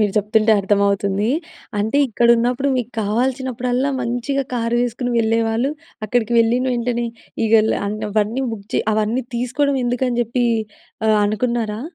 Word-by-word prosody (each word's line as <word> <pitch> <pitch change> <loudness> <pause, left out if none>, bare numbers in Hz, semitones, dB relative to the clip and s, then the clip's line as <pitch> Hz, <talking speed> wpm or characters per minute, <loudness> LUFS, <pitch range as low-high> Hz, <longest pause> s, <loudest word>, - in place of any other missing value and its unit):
మీరు 205 -2 +2
చెప్తుంటే 215 +2 +3
అర్థమవుతుంది. 200 +1 +1 0.5
అంటే 220 +7 +1
ఇక్కడున్నప్పుడు 235 +4 +2
మీకు 245 -1 -2
కావాల్సినప్పుడల్లా 250 +3 -1
మంచిగా 245 +3 -1
కారు 230 0 0
వేసుకొనెళ్ళేవాళ్ళు, 235 0 0 0.3
అక్కడికి 240 +1 0
వెళ్ళిన 235 +3 +3
వెంటనే 240 0 -1 0.4
ఇగా 220 0 +5
ల - - +2
ఆన్ 210 +1 -3
అవన్నీ 215 +5 0
బుక్ 200 -2 -8
చే - - +3
అవన్నీ 220 +4 0
తీసుకోవడం 275 +4 0
ఎందుకని 245 0 0
చెప్పి 240 +2 -1 0.6
ఆహ్, 215 -1 +4
అనుకున్నారా? 220 0 -1
235 Hz, 125 wpm, -20 LUFS, 215-245 Hz, 0.6 s, ఇగా